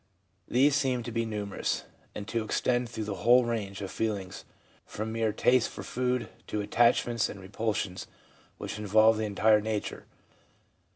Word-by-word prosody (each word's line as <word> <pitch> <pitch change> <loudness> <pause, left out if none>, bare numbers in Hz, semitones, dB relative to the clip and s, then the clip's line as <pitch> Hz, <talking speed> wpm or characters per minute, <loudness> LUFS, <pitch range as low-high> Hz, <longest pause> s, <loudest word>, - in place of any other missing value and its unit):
These 135 +3 +4
seem 130 -4 +1
to 120 - -6
be 115 0 -1
numerous, 105 -2 -2 0.3
and 100 - -6
to 115 -1 -1
extend 120 +2 0
through 110 -2 -4
the 105 -2 -4
whole 120 +3 +6
range 105 -4 -3
of 95 - -5
feelings 100 -5 -3 0.4
from 110 +1 -5
mere 110 -1 0
tastes 125 +3 +3
for - - -8
foods 125 0 -1 0.2
to 105 - -2
attachments 115 +2 +2
and 100 - -8
repulsions 100 -1 -3 0.5
which - - -6
involve 110 +2 +4
the 110 - 0
entire 105 +1 +3
nature. 110 -1 -4
110 Hz, 155 wpm, -29 LUFS, 105-120 Hz, 0.5 s, whole